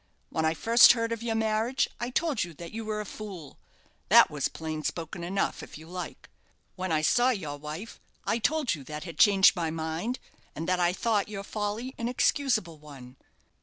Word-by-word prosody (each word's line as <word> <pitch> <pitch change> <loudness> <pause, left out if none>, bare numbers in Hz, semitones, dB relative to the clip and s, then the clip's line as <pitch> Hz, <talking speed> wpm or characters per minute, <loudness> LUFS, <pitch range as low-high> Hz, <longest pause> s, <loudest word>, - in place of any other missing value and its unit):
When 160 - 0
I 160 +1 +1
first 230 +9 +7
heard 230 -1 -2
of 230 -1 -3
your 230 -1 -1
marriage, 220 +3 +1
I 240 - -2
told 295 -1 0
you 170 -2 -8
that 170 +2 -9
you 225 +1 -5
were 215 -1 -3
a - - -6
fool. 190 -9 -9 0.5
That - - +7
was - - 0
plain 155 -1 -5
spoken 165 +1 -4
enough, 195 +3 -1
if - - -10
you 160 - -12
like. 180 +1 -7 0.5
When 185 -1 -3
I 155 -1 +1
saw 245 +7 +4
your 160 - -3
wife, 155 +10 -7 0.3
I 230 - 0
told 290 +3 +1
you 145 -5 -7
that 150 +1 -6
had 170 -3 -9
changed 200 -2 +6
my 170 -3 -1
mind, 160 +9 -3 0.4
and 160 - -4
that 180 0 +1
I 175 0 +3
thought 210 +1 0
your 200 -2 -5
folly 215 +5 -4
an 230 - -1
excusable 240 - +1
one. 135 -4 -12
195 Hz, 200 wpm, -28 LUFS, 160-230 Hz, 0.5 s, first